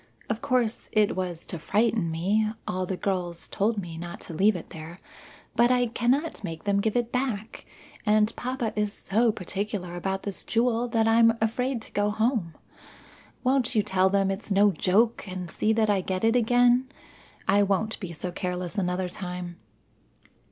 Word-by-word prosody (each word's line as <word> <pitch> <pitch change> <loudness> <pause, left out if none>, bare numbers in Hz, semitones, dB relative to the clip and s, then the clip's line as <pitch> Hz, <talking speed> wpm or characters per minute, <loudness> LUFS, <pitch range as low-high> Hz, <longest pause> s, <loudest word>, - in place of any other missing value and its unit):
Of 220 - -3
course, 245 -3 0
it 215 -1 +3
was 180 -3 -4
to 175 - -5
frighten 210 +1 +1
me; 200 +7 +1 0.2
all 185 - -2
of 185 - -3
the 190 - -2
girls 180 -4 -2
told 215 +3 0
me 170 -4 -5
not 170 0 -7
to - - -8
leave 200 +6 +3
it 175 - -7
there. 160 +2 -9 0.6
But 240 +1 +5
I 250 -1 +3
I - - +3
cannot 260 +5 0
make 165 -4 -5
them 200 -1 +2
give 220 +1 0
it 240 -1 -1
back, 240 -4 -3 0.4
and 215 0 +3
papa 250 -2 -2
is 210 -1 0
so 225 +3 +1
particular 195 -1 -4
about 190 +2 -2
this 200 -2 -6
jewel 235 +1 +1
that 225 -1 +1
I'm 230 0 +5
afraid 235 +2 -1
to - - -13
go 205 0 +1
home. 215 - 0 0.9
Won't 255 -2 +2
you 215 - +4
tell 190 0 +2
them 195 0 +2
it's 195 +3 -5
no 200 +1 +5
joke, 205 +7 +2
and 180 -2 -5
see 215 - +1
that 220 -1 +2
I 195 -2 +2
get 185 +1 -3
it 225 +1 +4
again. 245 +2 +4 0.6
I 205 - +4
won't 200 +2 0
be 185 -5 -6
so 175 +2 -5
careless 180 +2 -3
another 180 0 -1
time." 180 -1 -6
205 Hz, 180 wpm, -27 LUFS, 185-230 Hz, 0.9 s, But